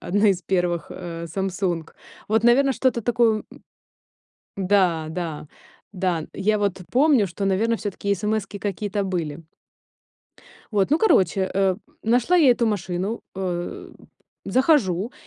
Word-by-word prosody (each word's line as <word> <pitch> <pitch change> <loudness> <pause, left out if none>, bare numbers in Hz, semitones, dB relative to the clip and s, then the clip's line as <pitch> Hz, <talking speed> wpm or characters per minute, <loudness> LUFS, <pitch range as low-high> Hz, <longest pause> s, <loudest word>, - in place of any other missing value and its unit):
одна 205 +3 +2
из 190 -2 +1
первых, 175 -2 -1
а, 170 -2 -6
"Самсунг"? 180 -1 -3 0.3
Вот, 220 +1 +2
наверно, 270 +3 +5
что-то 255 -2 +1
такое, 230 -2 +2
м - - -16 0.9
Да, 185 -5 +2
да, 160 -3 -5 0.4
да. 180 -5 -1
Я 210 +2 +1
вот 200 -2 -1
помню, 265 -4 +4
что, 195 +2 -4
наверно, 220 +4 +1
всё-таки 200 -1 -2
эсэмэски 205 0 -2
какие-то 205 0 -2
были. 170 -6 -3 1.3
Вот, 200 +2 +1
ну, 305 - +4
короче, 190 - +3
э, 190 -1 +2 0.3
нашла 245 +10 +3
я 295 -7 +6
эту 235 0 0
машину, 195 +1 -2
э, 180 -2 -4 0.5
захожу, 245 - +2
195 Hz, 125 wpm, -23 LUFS, 180-220 Hz, 1.3 s, я